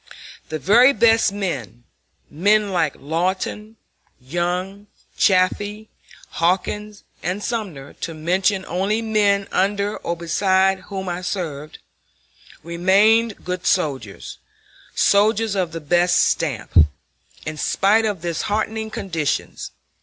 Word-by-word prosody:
The 155 - -3
very 230 - +5
best 225 -2 +4
men, 140 - -4 0.4
men 205 +5 +2
like 160 -6 0
Lawton, 185 +8 -3 0.4
Young, 180 +8 -3 0.3
Chaffee, 205 +3 +1 0.4
Hawkins, 200 +4 -1 0.2
and 185 +5 -3
Sumner, 190 - -4
to 165 - -4
mention 185 +4 0
only 195 +6 -1
men 205 -3 +2
under 200 +2 0
or 170 - -4
beside 190 +3 +2
whom 190 -2 -5
I 175 0 -3
served, 155 -5 -5 0.9
remained 200 +7 +2
good 180 0 -3
soldiers, 140 - -2 0.6
soldiers 215 +1 +3
of 185 -4 -1
the 165 - -5
best 175 +3 +2
stamp, 135 -10 0 0.7
in 155 0 -5
spite 210 +8 +2
of 205 -6 -2
the 175 - -1
disheartening 220 +5 -2
conditions. 185 -9 -3
190 Hz, 110 wpm, -21 LUFS, 170-210 Hz, 0.9 s, very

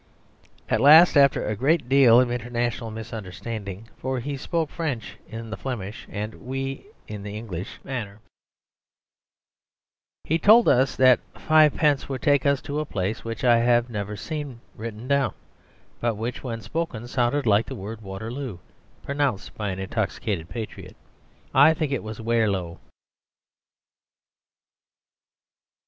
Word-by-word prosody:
At - - +1
last, 160 +5 +8
after 140 -1 +5
a 105 - -1
great 145 +6 +1
deal 130 -3 +6
of 125 -1 +2
international 120 -1 -2
misunderstanding 110 -1 -7
(for 130 0 -2
he 140 +4 -4
spoke 160 +2 -2
French 145 -10 -4
in 115 0 -8
the - - -4
Flemish 110 -6 -6
and 105 +1 -6
we 135 +1 -4 0.2
in 105 -1 -7
the 105 +1 -6
English 100 -5 -6
manner), 110 -6 -5 2.0
he 165 +2 0
told 225 +5 +6
us 130 +1 +3
that 130 -1 +6 0.2
fivepence 150 -2 +3
would 130 -3 -4
take 145 -1 +3
us 140 -1 +1
to 145 +1 -3
a - - 0
place 100 -3 -3
which 115 +1 -5
I 120 -2 +5
have 120 0 +2
never 105 -1 -4
seen 145 -5 -5 0.2
written 110 +2 -7
down, 140 -4 +1 0.6
but 115 -2 0
which 115 +3 -4
when 115 -3 -4
spoken 120 0 -4
sounded 125 +3 0
like 105 0 +3
the - - -6
word 105 +3 -7
"Waterloo" 110 +3 -6 0.5
pronounced 140 -7 -1
by 105 -2 -3
an 95 - -4
intoxicated 95 -2 -3
patriot; 115 -3 -7 0.6
I 145 +4 +6
think 155 -2 -2
it 135 - -1
was 110 0 -7
Waerlowe. 105 -7 0
120 Hz, 135 wpm, -25 LUFS, 110-140 Hz, 2.0 s, last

